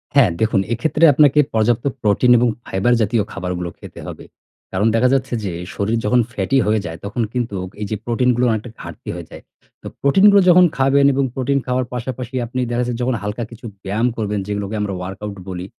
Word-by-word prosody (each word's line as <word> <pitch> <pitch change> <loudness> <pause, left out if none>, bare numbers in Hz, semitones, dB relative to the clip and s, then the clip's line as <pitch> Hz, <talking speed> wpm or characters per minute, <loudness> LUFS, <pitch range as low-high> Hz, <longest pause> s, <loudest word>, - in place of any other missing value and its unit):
হ্যাঁ 120 -11 +5
দেখুন, 110 -2 +2
এক্ষেত্রে 155 +6 -1
আপনাকে 145 +1 +4
পর্যাপ্ত 115 +3 +1 0.2
প্রোটিন 110 +4 +3
এবং 120 - +3 0.2
fiber 100 +6 +1
জাতীয় 110 0 +1
খাবারগুলো 90 -2 -4
খেতে - - -11
হবে। - - -8 0.5
কারণ 100 +4 +1
দেখা 125 +3 +3
যাচ্ছে, 130 -2 0
যে 95 - -2 0.2
শরীর 110 +3 0
যখন 125 +4 +3
ফ্যাটি 100 +7 0
হয়ে 105 0 +2
যায়, 80 0 -6
তখন 115 +4 -3
কিন্তু, 120 -5 -2 0.3
এই - - -1
যে - - 0
প্রোটিনগুলো 125 +1 +1
অনেকটা 110 +1 -3
ঘাটতি - - -9
হয়ে - - -7
যায়। - - -10 0.4
তো - - -8
প্রোটিনগুলো 200 +8 +6
যখন 180 +1 +7
খাবেন 135 +1 +3
এবং 135 +1 +1
প্রোটিন 135 +2 0
খাওয়ার 125 0 0
পাশাপাশি, 125 +1 -5
আপনি 125 +2 -5
দেখা 120 +1 0
যাচ্ছে 120 0 -3
যখন 125 0 0
হালকা 105 +3 -3
কিছু 115 +1 -12 0.2
ব্যায়াম 105 +5 0
করবেন, 105 -2 -2
যেগুলোকে 105 0 -3
আমরা 100 -2 -2
workout 100 +2 -6
বলি, 90 0 -5
115 Hz, 190 wpm, -19 LUFS, 105-130 Hz, 0.5 s, যখন